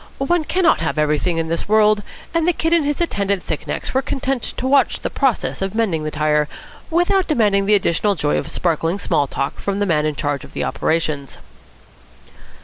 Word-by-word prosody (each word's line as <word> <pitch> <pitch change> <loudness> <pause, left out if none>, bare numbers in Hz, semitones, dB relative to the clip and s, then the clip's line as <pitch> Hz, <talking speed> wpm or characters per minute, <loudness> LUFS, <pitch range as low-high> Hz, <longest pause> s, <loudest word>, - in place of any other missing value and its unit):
One 315 +4 +1
cannot 360 - +2
have 160 - -2
everything 150 +3 +1
in 165 0 -1
this 165 +4 -3
world, 215 -1 +4 0.3
and 330 0 +1
the 355 - +4
Kid 325 +1 0
and 335 -2 +4
his 290 0 -1
attendant 200 - 0
thick 155 - -4
necks - - -4
were 265 - +2
content 270 -2 -2
to 255 - -5
watch 275 +1 +3
the - - -3
process 265 -8 0
of 195 +1 -2
mending 190 -9 0
the - - -1
tyre, 150 0 +1 0.4
without 355 +3 +2
demanding 205 -9 +2
the 210 - +5
additional 200 +1 +1
joy 150 -3 0
of - - -6
sparkling 165 +1 0
small 160 -7 0
talk 135 +1 -3
from 200 -1 -2
the 205 - +1
man 155 -5 +1
in 150 - -2
charge 145 -1 -2
of - - -13
the - - -2
operations. 155 -4 -1
200 Hz, 200 wpm, -20 LUFS, -, 0.4 s, the